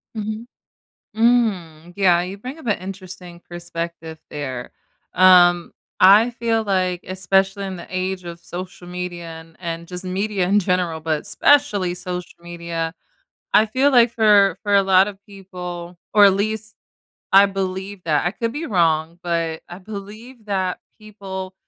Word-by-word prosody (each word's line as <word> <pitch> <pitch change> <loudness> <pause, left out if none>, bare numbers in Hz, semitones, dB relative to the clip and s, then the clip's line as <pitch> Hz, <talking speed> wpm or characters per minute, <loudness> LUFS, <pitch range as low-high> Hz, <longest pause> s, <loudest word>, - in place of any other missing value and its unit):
Mhm. 215 +2 -5 0.7
Mm, 195 -9 +1
yeah, 180 -3 +4
you 190 +3 -6
bring 255 +8 -8
up 315 - -12
a 210 -5 0
interesting 185 -2 -9
perspective 170 -2 -6
there. 130 -4 -6 0.4
Um, 175 -2 +5 0.3
I 205 +6 +7
feel 230 -2 -1
like, 185 -3 0
especially 190 +1 0
in 190 -1 -5
the 175 - -10
age 185 0 -2
of 170 0 -8
social 180 0 -8
media 180 -1 -6 0.2
and 160 0 -18
and 170 -1 -5
just 180 +1 -7
media 190 +1 -1
in 200 +2 +4
general, 180 -3 -1
but 155 -1 -1
especially 210 -12 +2
social 180 -1 -6
media, 170 -1 -5 0.6
I 215 - +5
feel 260 +6 +2
like 240 -3 +5
for 210 -3 +4
for 205 -1 0
a 200 - +6
lot 190 0 +4
of 200 -2 -9
people 180 -3 -8 0.2
or 205 -1 +8
at 200 - +7
least 215 +2 -3 0.6
I 200 +1 +8
believe 195 0 -4
that. 155 -1 +1
I - - +2
could 230 +3 -3
be 310 +4 -4
wrong, 165 - +1
but 165 -2 -2
I 175 - -9
believe 215 +4 -10
that 190 -3 -1 0.2
people 195 -3 -8
185 Hz, 150 wpm, -21 LUFS, 175-205 Hz, 0.7 s, or